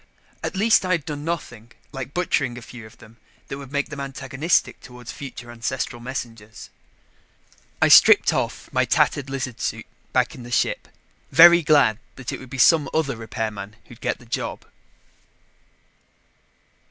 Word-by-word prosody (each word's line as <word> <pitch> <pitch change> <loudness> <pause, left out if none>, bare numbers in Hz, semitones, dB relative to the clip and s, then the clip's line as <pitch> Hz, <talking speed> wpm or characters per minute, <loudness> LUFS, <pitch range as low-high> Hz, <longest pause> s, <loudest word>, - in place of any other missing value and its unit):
At - - -3
least 220 +3 +4
I 185 0 0
had 165 -5 -1
done 145 -1 -5
nothing, 120 -9 -5 0.2
like 135 0 -6
butchering 140 -8 -1
a 120 - -9
few 120 -2 -11
of 115 +1 -19
them, 115 0 -17 0.3
that 135 - -5
would 140 -1 -11
make 145 0 -1
them 145 -2 -7
antagonistic 140 +3 -1
toward 125 -2 -13
future 125 -4 -8
ancestral 120 +1 -4
messengers. 115 -3 -8 1.1
I - - +6
stripped - - +7
off - - -3
my - - +3
tattered 140 -2 +1
lizard 130 -3 -5
suit - - -3 0.3
back - - +1
in - - -11
the 120 - -10
ship, 120 - 0 0.4
very 170 +1 +8
glad 140 -8 +3 0.2
that 130 -3 -6
it - - -5
would 130 - -12
be 135 - -7
some 150 +2 +5
other 150 -5 0
repairman 110 -2 -5
who'd 120 - -16
get - - -1
the 120 - -18
job. 115 - -4
130 Hz, 160 wpm, -23 LUFS, 120-145 Hz, 1.1 s, very